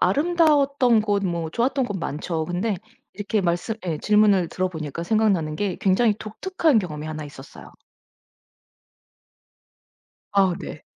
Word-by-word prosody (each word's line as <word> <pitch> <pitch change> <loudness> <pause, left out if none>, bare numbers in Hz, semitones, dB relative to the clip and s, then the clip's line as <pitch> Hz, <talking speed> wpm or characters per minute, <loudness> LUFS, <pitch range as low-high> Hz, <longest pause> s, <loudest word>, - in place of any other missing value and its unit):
아름다웠던 285 -7 +3
곳 205 -2 0
뭐 170 -3 -2
좋았던 260 - 0
곳 205 -3 -4
많죠. 160 +1 -3
근데 185 +4 -2 0.4
이렇게 205 +1 -1
말씀 175 +4 -1
예 160 -3 -1
질문을 210 -4 +3
들어보니까 170 -4 -3
생각나는 180 -6 +1
게 200 -4 -2
굉장히 210 +4 +3
독특한 310 - 0
경험이 155 -6 -4
1 155 -1 -5
있었어요. 145 -1 -12 2.6
아 190 -3 +3
네. 150 - -8
195 Hz, 270 characters per minute, -23 LUFS, 170-225 Hz, 2.6 s, 아름다웠던